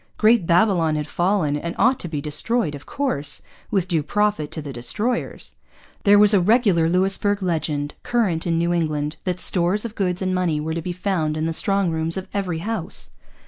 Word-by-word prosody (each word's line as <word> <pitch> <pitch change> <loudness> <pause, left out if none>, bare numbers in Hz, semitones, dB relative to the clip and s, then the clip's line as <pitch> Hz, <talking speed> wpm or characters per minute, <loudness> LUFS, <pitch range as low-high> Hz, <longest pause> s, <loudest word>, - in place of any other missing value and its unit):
Great 215 -5 +4
Babylon 170 -3 +3
had 150 -1 -2
fallen, 175 -2 0
and 170 +3 -4
ought 250 +5 +3
to - - -3
be 155 -3 -4
destroyed 160 +5 -1
of 145 -1 -10
course, 265 - -2 0.3
with 190 -3 0
due 165 -4 +1
profit 205 -1 0
to - - -6
the 145 -3 -7
destroyers. 205 - -2 0.5
There 205 0 +7
was 210 +1 +7
a 200 - +5
regular 195 -5 +3
Louisbourg 195 +3 +2
legend, 155 -4 -2
current 195 -9 0
in 165 -1 +1
New 170 +1 +1
England, 155 -3 -1
that 180 -1 -2
stores 185 +5 +1
of 225 - -5
goods 180 -4 -1
and 185 -1 -1
money 180 -4 0
were 160 +1 -3
to 165 - -3
be 180 - -4
found 175 -4 -1
in 155 - -1
the 165 - -1
strong 195 +1 +1
rooms 160 +2 -1
of 190 +1 -5
every 190 -5 -2
house. 215 -5 -4
175 Hz, 195 wpm, -22 LUFS, 160-205 Hz, 0.5 s, There